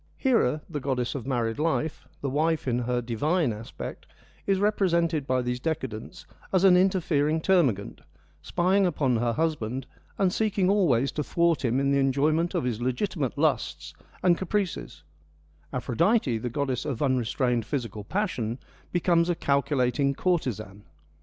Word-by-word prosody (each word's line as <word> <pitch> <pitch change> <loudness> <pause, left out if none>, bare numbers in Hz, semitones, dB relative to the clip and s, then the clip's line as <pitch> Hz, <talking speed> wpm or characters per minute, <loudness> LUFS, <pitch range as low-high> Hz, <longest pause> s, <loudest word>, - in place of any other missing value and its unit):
Hera, 155 - +2
the 145 - -4
goddess 130 -3 -1
of 130 -3 -6
married 120 -2 -1
life, 160 0 -1
the 140 - -1
wife 155 +1 0
in 120 -1 +1
her 125 0 -1
divine 145 +4 0
aspect, 110 +2 -8 0.4
is 195 -1 +3
represented 170 -7 +1
by 130 -1 +1
these 125 0 -2
decadents 135 - -4 0.3
as 185 -1 +2
an 190 -2 +7
interfering 165 -5 +2
termagant, 150 - +1 0.4
spying 185 - +2
upon 135 -8 +1
her 120 +1 0
husband 135 -5 -1 0.3
and 190 -2 +2
seeking 205 -4 +1
always 140 - +2
to 150 - -2
thwart 170 +1 +1
him 125 +1 +1
in 140 0 +1
the 140 - +3
enjoyment 150 +5 +1
of - - 0
his 120 -2 -2
legitimate 130 - -1
lusts - - 0 0.3
and 175 -2 +4
caprices; 190 -1 -3 0.7
Aphrodite, 130 - +1
the 125 - -3
goddess 130 -1 -2
of 140 -5 -3
unre 130 -2 +1
strained 120 -2 0
physical 115 -7 -4
passion, 125 - -2 0.3
becomes 175 -1 +2
a 175 - +2
calculating 140 -2 +1
courtesan. 110 - -2
140 Hz, 145 wpm, -27 LUFS, 125-175 Hz, 0.7 s, an